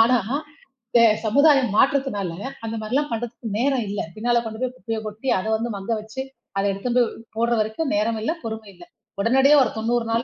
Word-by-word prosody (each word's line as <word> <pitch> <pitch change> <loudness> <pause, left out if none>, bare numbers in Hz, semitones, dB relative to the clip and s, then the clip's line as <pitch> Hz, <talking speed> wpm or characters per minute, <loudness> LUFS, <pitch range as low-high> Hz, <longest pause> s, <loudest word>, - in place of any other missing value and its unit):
ஆனா, 240 +3 +6 0.8
இந்த 235 - +5 0.2
ச - - -5
சமுதாயம் 275 +1 +5
மாற்றத்துனால 260 -8 +2 0.3
அந்தமாரி 220 0 -4
எல்லாம் 290 +2 +1
பண்றதுக்கு 230 0 -4
நேரம் 260 0 +1
இல்ல. 205 - -3 0.2
பின்னால 235 +2 +1
கொண்டு 220 0 -6
போய் 255 -1 0
குப்பைய 225 -3 -4
கொட்டி 215 +5 -4
அத 185 - -5
வந்து 230 +2 -2
மங்க 200 +3 -5
வச்சு, 220 +5 -6 0.4
அத 195 - +1
எடுத்துன்னு 235 +6 -2
போய் 235 -1 0 0.2
போட்ற 235 +1 +1
வரைக்கும் 220 +8 -1
நேரம் 220 +2 +1
இல்ல, 310 +9 0
பொறுமை 220 -2 -6
இல்ல. 175 0 -14 0.4
உடனடியா 265 +7 +5
ஒரு - - -2
தொண்ணூறு 230 +1 0
நாள் 230 +1 +1
230 Hz, 190 wpm, -23 LUFS, 220-255 Hz, 0.8 s, ஆனா